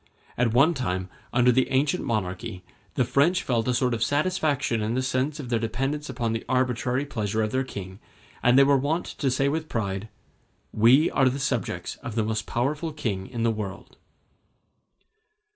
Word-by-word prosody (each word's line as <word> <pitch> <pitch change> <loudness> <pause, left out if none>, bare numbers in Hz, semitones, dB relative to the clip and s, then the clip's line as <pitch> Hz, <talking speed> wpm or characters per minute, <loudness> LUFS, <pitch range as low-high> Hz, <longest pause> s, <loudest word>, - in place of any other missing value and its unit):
At 120 -2 +1
one 140 +9 +5
time, 95 - -2 0.2
under 120 +1 +4
the 130 +1 +2
ancient 145 +6 +1
monarchy, 90 -4 -3 0.3
the 125 - +2
French 165 +9 +2
felt 115 -2 0
a 125 - +2
sort 125 -1 +1
of 115 - -3
satisfaction 145 -5 +1
in 110 +2 -1
the 130 - 0
sense 130 +4 -1
of 130 -5 -6
their 115 -2 +1
dependence 135 +6 -2
upon 120 -3 -2
the 115 - -3
arbitrary 125 +1 0
pleasure 110 -5 -1
of 110 - -2
their 130 +1 +1
king, 95 -6 -8 0.4
and 125 +1 +4
they 140 - +8
were 140 0 +4
wont 155 +6 -1
to 135 - -2
say 135 +2 +1
with 155 +2 -2
pride, 100 -1 -3 0.6
"We 125 +8 +5
are 130 - +3
the 130 - -3
subjects 130 -6 -2
of 115 - -7
the 110 - +1
most 110 -1 -2
powerful 145 +7 -1
king 110 -11 -3
in 120 -3 -4
the 115 - +3
world." 105 -3 -6
125 Hz, 180 wpm, -26 LUFS, 110-140 Hz, 0.6 s, they